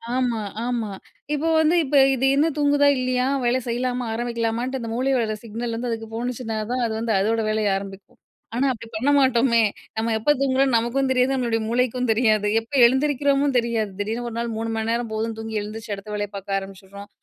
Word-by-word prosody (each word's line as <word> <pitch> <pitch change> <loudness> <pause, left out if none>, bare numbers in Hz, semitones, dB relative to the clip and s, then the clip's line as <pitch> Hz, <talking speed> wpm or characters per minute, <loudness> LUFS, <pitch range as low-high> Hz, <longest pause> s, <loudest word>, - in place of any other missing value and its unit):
ஆமா, 245 -4 0 0.2
ஆமா. 235 -4 -2 0.4
இப்போ 315 +3 0
வந்து 315 +2 +3
இப்ப 290 +1 -2 0.2
இது 260 - 0
இன்னும் 305 +1 +2
தூங்குதா? 285 0 +4
இல்லையா? 255 0 0 0.2
வேலை 245 +2 +2
செய்யலாமா? 245 +1 -1
ஆரம்பிக்கலாமான்னுட்டு 235 +2 -2
அந்த 230 - -5
மூளையோட 245 -4 0
சிக்னல் 230 +1 -4
வந்து 245 +1 -3
அதுக்கு 225 -1 -5
போனுச்சின்னா 240 -1 -3
தான் 250 -1 0
அது 220 - -3
வந்து 230 -1 -1
அதோட 225 +3 +1
வேலையை 215 -2 +1
ஆரம்பிக்கும். 195 0 -10 0.4
ஆனா, 265 +3 +1
அப்படி 230 -1 -10
பண்ண 255 +6 0
மாட்டோமே! 245 -3 +4 0.4
நம்ம 225 +1 0
எப்போ 225 +7 +2
தூங்குறோம்னு 265 -1 +2
நமக்கும் 240 +4 0
தெரியாது, 255 +1 +2
நம்மளுடைய 235 -3 0
மூளைக்கும் 250 0 0
தெரியாது. 215 -2 +2
எப்போ 230 +5 -8
எழுந்திரிக்கிறோமோ 280 +2 +2
தெரியாது. 230 -3 0
திடீர்னு 225 +4 -2
ஒரு 230 - -8
நாள் 235 0 -2
3 225 +1 -3
மணி 220 0 -2
நேரம் 235 -1 -1
போதும்ன்னு 220 +1 -2
தூங்கி 225 -1 -4
எழுந்திரிச்சி, 215 +1 -7
அடுத்த 200 +2 -10
வேலைய 205 0 -2
பார்க்க 195 0 -2
ஆரம்பிச்சிடுறோம். 195 +1 -11
235 Hz, 180 wpm, -23 LUFS, 220-255 Hz, 0.4 s, தூங்குதா